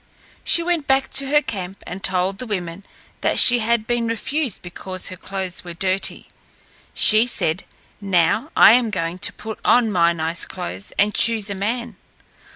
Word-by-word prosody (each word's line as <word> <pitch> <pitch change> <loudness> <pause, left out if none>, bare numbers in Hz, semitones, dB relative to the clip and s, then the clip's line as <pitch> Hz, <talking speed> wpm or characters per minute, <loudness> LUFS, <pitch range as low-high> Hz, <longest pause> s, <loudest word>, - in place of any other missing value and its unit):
She 340 - +3
went 335 -4 -1
back 270 0 +1
to 275 0 0
her 295 +2 +3
camp 195 -3 -6
and 185 +2 -8
told 185 +1 0
the 255 - -6
women 185 -2 -5 0.4
that - - 0
she 245 -1 +7
had 230 0 0
been 240 0 -1
refused 250 +2 -2
because 185 +1 -5
her 185 - -7
clothes 190 -1 -6
were 175 -1 -9
dirty. 190 +2 -2 0.7
She 220 +2 +4
said, 175 -6 -1 0.4
"Now, 195 - +1
I - - +9
am 240 0 +3
going 175 -3 -3
to - - +1
put 220 +1 -8
on 235 -3 +3
my 170 -3 +3
nice 165 0 -3
clothes 90 +3 -7
and 210 +1 +2
choose 220 -3 +1
a - - -1
man. 230 +2 -3
200 Hz, 170 wpm, -21 LUFS, 180-235 Hz, 0.7 s, I